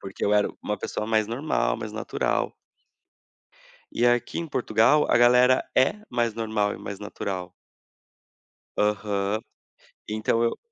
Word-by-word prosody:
Porque 95 0 -5
eu 105 - +2
era 105 - +3
uma 105 -1 -2
pessoa 105 - -4
mais 110 -1 +2
normal, 115 - -1
mais - - -6
natural. - - -1 1.4
E 120 - +2
aqui 120 -1 +1
em 170 -1 -4
Portugal, 120 +4 +3
a - - +5
galera 125 +1 +5
é 130 +10 +4
mais 120 -2 0
normal, 110 -2 -1
é - - -8
mais 100 - -7
natural. 95 -3 -5 1.3
Aham, 105 0 0 0.7
então 110 +2 0
eu 115 - 0
110 Hz, 135 wpm, -25 LUFS, 105-120 Hz, 1.4 s, a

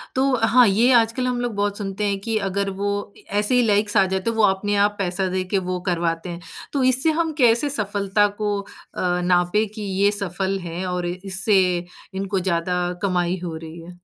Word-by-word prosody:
तो 265 0 +2
हाँ, 245 0 +6
ये 230 +6 +3
आजकल 235 +2 +2
हम 245 -1 -1
लोग 240 -2 -2
बहुत 205 0 -1
सुनते 200 0 -4
हैं 200 -1 -1
कि 225 0 -1
अगर 200 +1 -1
वो 205 0 0 0.3
ए - - -18 0.2
ऐसे 210 +4 +2
ही 250 - +5
लाइक्स 205 0 +2
आ 190 - +5
जाते 190 +3 -1
हैं 230 - -2
वो 220 - +3
अपने 205 +1 +2
आप 205 0 -1
पैसा 185 0 -1
दे 185 0 -1
के - - +4
वो 180 0 -1
करवाते 170 0 -1
हैं। 170 0 -6 0.3
तो 275 -2 +1
इससे 260 +5 +3
हम 325 0 -1
कैसे 240 +2 +3
सफलता 205 -3 +1
को 205 0 -2
अ, - - -17 0.6
नापें 180 +4 +2
कि 215 - -7
ये 200 0 +1
सफल 195 -1 -2
है 175 +1 -5
और 180 -1 -2
इससे 190 +3 +1 0.5
इनको 195 0 -2
ज़्यादा 180 0 -1 0.2
कमाई 180 -1 0
हो 165 -2 -4
रही 160 +1 -9
है? 175 +2 -11
200 Hz, 205 wpm, -22 LUFS, 180-220 Hz, 0.6 s, हाँ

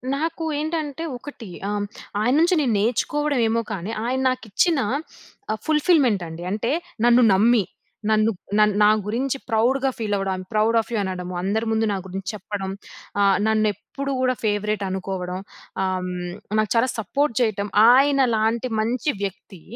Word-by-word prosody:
నాకు 325 +3 -2 0.2
ఏంటంటే 310 -1 -3
ఒకటి 265 -4 -10 0.2
ఆహ్, 205 0 -1 0.4
ఆయన్నుంచి 310 - +3
నేను 250 -6 +1
నేర్చుకోవడం 275 +6 0
ఏమో 230 +1 +1
కానీ 195 +2 -4
ఆయన 255 +2 0
నాకిచ్చిన 255 - +1 0.9
ఫుల్‌ఫి‌ల్‌మెంట్ 295 - +3
అండి 165 +1 -8
అంటే 220 +5 -1 0.3
నన్ను 240 +1 +6
నమ్మి 220 +2 +4 0.5
నన్ను 215 +1 +3 0.3
నన్ 210 -1 +4
నా 210 - +7 0.2
గురించి 255 +6 -1
ప్రౌడ్‌గా 255 +5 +2
ఫీల్ 215 -3 -2
అవ్వడం, 195 -1 -1
I - - -6
am 185 - -6
proud 215 +2 +2
of - - -14
you 225 - +1
అనడం, 185 -2 -4
అందరి 205 +5 -1
ముందు 220 0 +2
నా - - 0
గురించి 190 0 -6
చెప్పడం, 195 -1 -5 0.5
ఆహ్, 195 -2 +4
నన్నెప్పుడు 220 +6 -1
గూడా 255 0 +2
ఫేవరెట్ 210 -1 0
అనుకోవడం, 185 -1 -4 0.4
ఆహ్, 185 -1 -1 0.5
నాకు 215 -2 +1
చాలా 230 +2 +4
సపోర్ట్ 275 +5 0
చేయటం. 215 -4 0 0.3
ఆయన 275 +1 +4
లాంటి 225 +3 0
మంచి 245 +6 0
వ్యక్తి 190 -2 -6
220 Hz, 145 wpm, -23 LUFS, 200-260 Hz, 0.9 s, నా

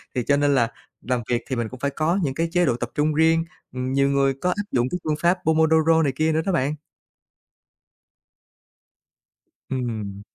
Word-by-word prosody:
thì 125 - 0
cho 140 +3 +2
nên 145 -1 +2
là 120 -2 +2 0.3
làm 125 -1 -1
việc 120 -1 +1
thì 130 - -1
mình 115 -2 -2
cũng 130 - -10
phải 140 +1 -1
có 160 +7 0
những 135 -3 -1
cái 165 +3 -1
chế 175 0 +3
độ 125 - +1
tập 120 0 -4
trung 150 +1 +1
riêng, 160 +1 +3 0.3
ừm, 130 +1 -3
nhiều 140 0 +3
người 135 -1 +2
có 180 - +1
áp 205 +3 -1
dụng 125 -1 +1
cái 180 - -2
phương 155 -1 0
pháp 175 +2 +3
Pomodoro 160 0 +4
này 140 - +1
kia 155 +3 +1
nữa 160 - +1
đó 195 - +1
bạn. 150 -4 0 2.9
Ừm. 110 -6 -4
140 Hz, 195 wpm, -23 LUFS, 125-160 Hz, 2.9 s, Pomodoro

